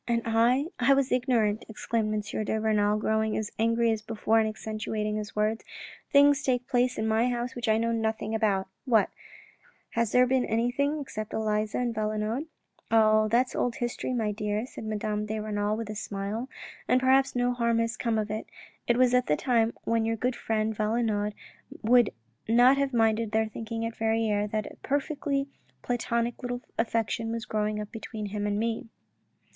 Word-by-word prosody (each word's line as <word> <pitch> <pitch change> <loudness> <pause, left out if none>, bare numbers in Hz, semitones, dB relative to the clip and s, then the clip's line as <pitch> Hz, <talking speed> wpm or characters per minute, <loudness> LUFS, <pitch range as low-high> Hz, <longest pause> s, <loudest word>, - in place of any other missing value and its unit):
" - - -45
And 235 -1 +1
I 235 +5 +3
— - - -43
I 265 +3 +5
was 275 -1 +1
ignorant," 240 -4 +1
exclaimed 220 0 -1
M. 210 0 -2
de 220 +1 -1
Renal, 210 -1 +2
growing 220 0 0
as 215 -1 -3
angry 230 +1 +3
as 220 -1 -1
before 225 +1 +1
and 220 -1 +2
accentuating 215 0 -3
his 210 0 -6
words. 215 +1 0 0.2
" - - -18
Things 285 0 +6
take 250 -3 0
place 250 -1 +1
in 220 - -1
my 220 +3 +2
house 245 +1 -2
which 240 -2 -4
I 220 - +4
know 230 +1 0
nothing 220 -1 -1
about.... 205 -4 +1 0.2
What! 225 -5 +3 0.8
has 230 -1 0
there 250 0 +5
been 255 0 +2
anything 280 +7 0
between 215 -5 -5
Elisa 215 -1 0
and 245 -2 0
Valenod? 215 +6 -2
" - - -51
" - - -42
Oh, 215 -1 +5
that's 240 +4 +1
old 245 - 0
history, 240 +1 -3
my 225 -4 0
dear," 210 +1 -2
said 235 - -9
Madame 210 0 -2
de 215 0 -2
Renal 210 0 -1
with 225 -2 -4
a - - -6
smile, 205 +4 -4 0.4
"and 255 - +4
perhaps 265 +1 +3
no 245 0 +2
harm 235 -1 +1
has 230 +1 0
come 230 -3 -1
of 215 -1 -1
it. 215 +1 -4 0.4
It 240 - +3
was 250 -1 +4
at 250 0 +3
the 150 - +2
time 235 -3 +2
when 230 -1 +1
your 225 0 0
good 245 +3 -1
friend 220 0 -1
Valenod 210 -1 0 0.5
would 240 0 +5 0.4
not 245 +4 +6
have 280 -1 +1
minded 225 -2 +1
their 220 0 +3
thinking 225 +1 -4
at 230 - -4
Verrieres 220 -2 +1
that 215 0 -2
a - - -10
perfectly 280 0 -1 0.4
platonic 235 -1 -1
little 245 -1 -3 0.2
affection 225 0 0
was 230 -1 -3
growing 210 0 -1
up 210 -1 -6
between 220 -1 -6
him 205 0 -3
and 205 0 0
me." 225 +1 -2
225 Hz, 195 wpm, -28 LUFS, 215-245 Hz, 0.8 s, Things